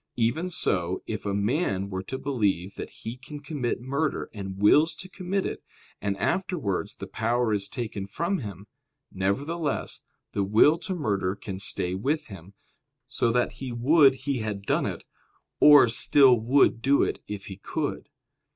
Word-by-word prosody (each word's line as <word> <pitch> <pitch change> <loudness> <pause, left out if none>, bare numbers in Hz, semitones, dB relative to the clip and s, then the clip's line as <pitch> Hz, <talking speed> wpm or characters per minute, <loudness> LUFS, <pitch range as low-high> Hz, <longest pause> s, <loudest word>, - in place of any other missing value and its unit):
Even 125 +10 0
so, 90 - -1
if 110 -1 -5
a - - 0
man 100 - 0
were 95 0 -3
to 130 +8 -5
believe 100 -9 -1
that - - -7
he 115 +2 -8
can 145 +3 -9
commit 140 -5 -3
murder, 140 +4 -2
and 95 -2 -6
wills 150 +11 +5
to 185 - -8
commit 190 +1 -3
it, - - -4 0.4
and 100 -1 -1
afterwards 180 - -1
the - - -7
power 115 0 0
is 100 -1 0
taken 110 -5 -5
from 170 - -1
him; 100 -4 -8 0.5
nevertheless, 140 - -2 0.3
the 100 - 0
will 110 +11 +5
to 185 - -4
murder 100 - -1
can 95 -2 -7
stay 90 -2 0
with 145 +11 -1
him, 95 0 -11 0.5
so 115 - 0
that 125 +1 +1
he 130 -2 -4
would 135 +4 +5
he 135 -1 -2
had 105 -2 -4
done - - +1
it, - - -6 0.5
or 145 -3 +8
still 130 +3 +5
would 120 +1 +3
do 140 +3 +4
it - - -2
if 100 -1 -6
he 95 - -8
could. - - -4
120 Hz, 165 wpm, -26 LUFS, 100-145 Hz, 0.5 s, or